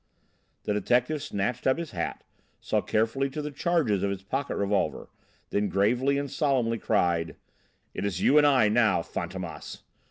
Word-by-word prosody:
The 105 - -1
detective 125 +8 +1
snatched 125 -1 -2
up 130 - +3
his 170 -2 -5
hat, - - -4 0.4
saw - - 0
carefully 115 +6 0
to 135 - -6
the 150 0 -4
charges 140 - +1
of 100 - 0
his 95 -1 -4
pocket 135 +8 -3
revolver, 100 0 -1 0.4
then 100 0 0
gravely 120 +9 +2
and 140 - -1
solemnly 130 -6 0
cried: 85 -5 +1 0.6
"It - - -4
is 100 -3 -2
you 150 +9 +5
and 145 - +5
I 130 -6 +4
now, 110 -5 +3
Fantômas!" 85 0 -6
115 Hz, 160 wpm, -27 LUFS, 100-140 Hz, 0.6 s, you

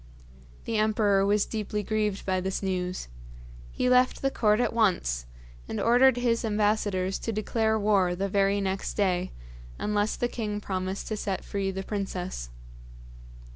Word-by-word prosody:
The 225 - -1
emperor 210 -2 +3
was 205 0 +3
deeply 210 -1 -3
grieved 210 -2 -1
by 185 -1 0
this 190 +2 -3
news. 185 - -2 0.6
He - - -1
left 250 +1 +3
the 270 - +2
court 210 -3 +2
at 245 - +1
once, 65 - +1 0.4
and - - -4
ordered 245 +2 +5
his 240 -1 +1
ambassadors 205 -3 0
to 230 - -3
declare 220 +1 0
war 200 -4 +2
the 195 +2 -1
very 200 +1 +2
next 195 0 -2
day, 185 -3 +1 0.5
unless 210 0 0
the 245 - 0
king 210 -4 -3
promised 190 -1 -3
to 215 - -2
set 195 -2 -3
free 195 -1 -2
the 190 0 -4
princess. 185 - -4
205 Hz, 150 wpm, -27 LUFS, 190-220 Hz, 0.6 s, ordered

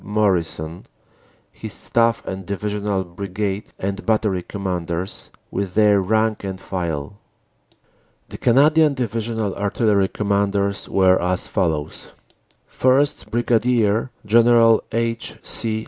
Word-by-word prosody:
Morrison, 90 -5 -1 0.6
his - - -8
Staff 115 0 0
and 95 0 -5
Divisional 100 0 -2
Brigade 100 +3 -4
and 100 +1 -4
Battery 105 -4 +1
Commanders, 90 -2 -4 0.2
with 95 -2 -3
their 105 -2 +4
rank 110 +2 0
and 95 -1 -5
file. 85 -1 -4 1.1
The - - -9
Canadian 150 +4 +4
Divisional 115 -3 -2
Artillery 100 -1 +1
Commanders 100 0 -1
were 95 -1 +4
as 90 +1 0
follows: 80 -7 -2 0.5
1st, 135 +3 +1
Brig. 115 -1 +1 0.2
General 115 +1 +5
H. 115 +1 -2
C. 110 -2 -1
100 Hz, 100 wpm, -21 LUFS, 95-115 Hz, 1.1 s, General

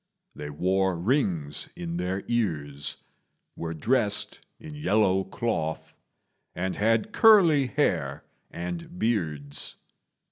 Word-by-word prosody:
They 75 - -7
wore 95 +4 +1
rings 85 - 0
in 85 -1 -4
their 90 +2 -2
ears, 75 -12 -1 0.6
were 80 0 -4
dressed 105 - +1 0.2
in 155 -1 -9
yellow 105 -9 +2
cloth, 95 -6 -3 0.6
and 95 +2 -2
had 110 +1 +1
curly 170 - +6
hair 70 - 0 0.2
and 85 0 -6
beards. 80 -10 -1
95 Hz, 100 wpm, -27 LUFS, 80-115 Hz, 0.6 s, curly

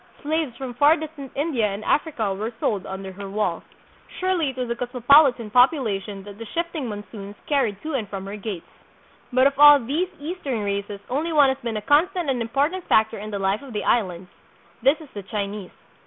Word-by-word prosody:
Slaves 300 -5 -1
from 260 -2 -6
far 290 +6 +5
distant 300 -3 -8
India 275 -7 +1
and 200 +1 -5
Africa 245 -10 0
were 215 +4 -4
sold 200 -3 -1
under 190 0 -6
her 200 +1 -8
walls. 195 -4 -1 0.6
Surely 370 -5 +1
it 260 - -8
was 250 -1 -2
a - - 0
cosmopolitan 250 -1 +4
popu 250 +7 +6
lation 205 -7 -4
that 205 +1 -11
the 230 - -6
shifting 335 -5 -2
monsoons 205 -1 -8
carried 250 -9 0
to 315 0 -4
and 225 -7 -2
from 195 -1 -6
her 200 +1 -6
gates. 205 -4 -6 0.7
But 255 +1 +4
of 275 0 +2
all 290 0 +10
these 295 +9 -1
Eastern 290 - -4
races 200 0 -3
only 305 +6 -1
one 290 -3 +5
has 265 0 -1
been 230 -4 -3
a 210 - -5
constant 330 - +2
and 250 -2 -2
important 285 +10 -1
factor 220 0 +3
in 210 +1 -6
the 205 - -3
life 195 +1 0
of 270 -4 -10
the 210 - -2
Islands. 180 -5 0 0.5
This 275 +6 +3
is 305 - -12
the 205 - -6
Chinese. 200 -1 -4
240 Hz, 200 wpm, -23 LUFS, 205-290 Hz, 0.7 s, all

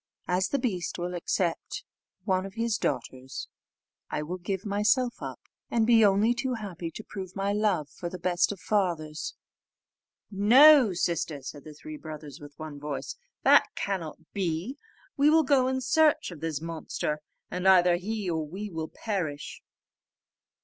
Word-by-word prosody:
As 185 +1 +1
the 280 - 0
beast 195 - -2
will 175 0 -3
accept 175 0 -2 0.4
of - - -30
one 185 -1 +2
of 195 0 -8
his 230 -1 0
daughters, 130 +2 -3 0.6
I 150 - -2
will 180 +4 -5
give 190 +2 -3
myself 215 +5 +1
up, - - -6 0.3
and 230 -2 +2
be 230 -1 +6
only 205 +3 +4
too 250 +1 -2
happy 185 -6 -5
to 215 - -9
prove 190 -3 -8
my 195 +1 0
love 205 -8 +1
for 175 +3 -6
the 185 - -6
best 175 +1 +1
of 200 - -7
fathers." 170 -8 -1 1.0
"No, 250 +5 +7
sister," 165 -5 -1
said 145 +2 -8
the 155 -1 -10
three 310 - -9
brothers 150 - -9
with 145 -1 -12
one 155 -2 -7
voice, 150 - -5 0.3
"that - - +6
cannot 180 -6 -3 0.2
be; 185 - -2 0.4
we 285 +2 +5
will 320 +1 +5
go 260 -2 +3
in 260 0 0
search 300 - +3
of 165 - -9
this 160 -3 -2
monster, 160 -2 -3 0.3
and 180 +1 -1
either 180 -2 +6
he 210 +2 -3
or 160 -2 0
we 200 +6 -6
will 160 -1 -4
perish." 175 -10 -4
185 Hz, 165 wpm, -28 LUFS, 165-220 Hz, 1.0 s, No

